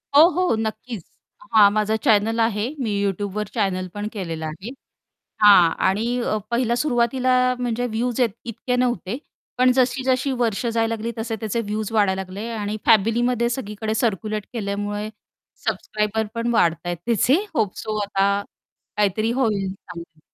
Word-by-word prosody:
हो, 310 +3 +9
हो. 360 -5 +1
नक्कीच. 220 -2 -4 0.5
हा 210 -2 +8
माझा 215 +1 0
चॅनल 225 -2 +3
आहे 220 -1 +1
मी 235 -5 -1
YouTubeवर 205 +1 -2
चॅनल 190 -5 -1
पण 205 0 -4
केलेलं 165 -6 -4
आहे. 160 +8 -6 0.7
हां. 200 -5 +8 0.2
आणि 230 +6 0 0.3
पहिल्या 235 0 +1
सुरुवातीला 250 -1 +1 0.3
म्हणजे 245 0 -1
व्हयूझ 240 +2 -2
इतके 235 +1 -2
नव्हते 240 -3 -1 0.4
पण 255 0 +5
जशी 255 +1 +1
जशी 260 +1 +1
वर्षं 235 -2 0
जायला 225 0 0
लागली 225 +1 -4
तसे 225 0 -3
त्याचे 220 +1 -2
व्हयूझ 215 -1 -3
वाढायला 200 -3 +2
लागले 190 +4 -7
आणि 210 -2 -3
फॅमिलीमध्ये 235 +2 +3
सगळीकडे 220 -3 -3
सर्क्युलेट 215 -2 -1
केल्यामुळे 205 -1 -3 0.6
सबस्क्रायबर 215 +1 -1
पण 230 +1 -1
वाढताहेत 175 -3 +1
त्याचे 235 +2 +3 0.2
होप 205 -10 0
सो 215 -1 -3
आता 200 0 +1 0.6
काहीतरी 210 +2 +1
होईल 210 -7 0
चांगल. 170 -4 -12
220 Hz, 140 wpm, -22 LUFS, 205-240 Hz, 0.7 s, हो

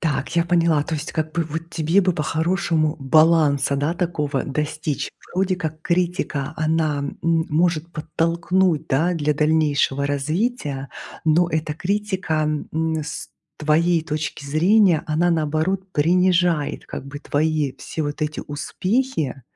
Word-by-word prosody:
Так 160 +1 -2
я 170 - +4
поняла. 170 -3 +3
То 160 - -3
есть 150 0 -5
как 155 -1 -2
бы 170 0 0
вот 165 +2 -6
тебе 165 +3 +2
бы 185 -2 +2
по-хорошему 160 0 0
баланса, 145 -1 +4
да, 145 +4 0
такого 155 -6 -1
достичь. 150 +1 -3 0.2
Вроде 185 0 +1
как 160 -3 -5
критика, 170 -6 -1
она, 155 -1 +1
м, 140 - -5 0.3
может 165 +1 +1
подтолкнуть, 165 +1 0
да, 160 +7 +2
для 150 -2 0
дальнейшего 150 -2 +2
развития. 145 - -2 0.4
Но 165 +2 +3
эта 155 -1 -1
критика, 185 -5 -1 0.2
м, 160 0 0
с 150 - -6 0.3
твоей 160 +2 +2
точки 155 -1 -4
зрения, 175 +3 +4
она, 165 +3 +2
наоборот, 165 +5 0
принижает 175 -1 +2
как - - -6
бы 145 +1 -7
твои 150 -2 0
все 160 - -4
вот 145 +1 -3
эти 150 0 -2
успехи, 160 - -2
160 Hz, 135 wpm, -22 LUFS, 150-175 Hz, 0.4 s, я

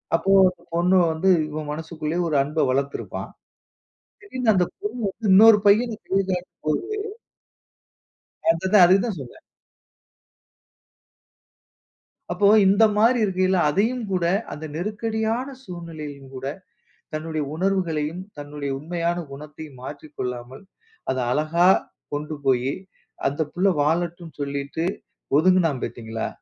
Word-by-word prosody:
அப்போ 195 +4 +1 0.2
அந்த 180 - -14
பொண்ணு 180 +2 +3 0.2
வந்து 170 +4 +1 0.2
இவன் 150 0 -5
மனசுகுள்ள 160 +1 -4
ஒரு 150 - +2
அன்பை 150 +1 0
வளர்த்திருப்பா. 140 +2 -2 1.0
திடீர்ன்னு 255 - +1
அந்த 180 -1 +3 0.2
பொண்ணு 230 +4 -4
வந்து 215 +3 -5
இன்னொரு 215 +2 +8
பையனை 220 +2 +4
கை 195 - +2
காட்டும் 180 -1 -5
போது 155 - 0 1.6
அத 170 +3 -2
தான் 200 -4 +8
அத 185 +2 +6
தான் 215 -6 -3
சொன்னேன். 130 -3 -10 2.9
அப்போ 180 +3 +3 0.2
இந்த 200 +3 +5
மாரி 230 +4 +4
இருக்கயில 185 -1 +1
அதையும் 225 +10 +1
கூட, 180 -2 0 0.3
அந்த 155 - -7
நெருக்கடியான 220 - -2
சூழ்நிலையிலும் 155 - -8
கூட, 130 +1 -5 0.7
தன்னுடைய 155 0 -3
உணர்வுகளையும் 170 -3 -1 0.2
தன்னுடைய 145 -1 -5
உண்மையான 170 +2 -2
குணத்தையும் 150 0 -10
மாற்றிக் 150 +2 -9
கொள்ளாமல், 125 +4 -5 0.5
அத 130 - -2
அழகா 155 +6 +2 0.5
கொண்டு 150 +1 -3
போயி, 130 +1 +2 0.5
அந்த 145 +3 -2
புள்ள 185 +3 +2
வாழட்டும்ன்னு 165 0 -1
சொல்லிட்டு 140 +3 -3 0.5
ஒதுங்குனான் 165 -5 +3
பார்த்தீங்களா? 110 -1 -4
165 Hz, 115 wpm, -23 LUFS, 145-190 Hz, 2.9 s, இன்னொரு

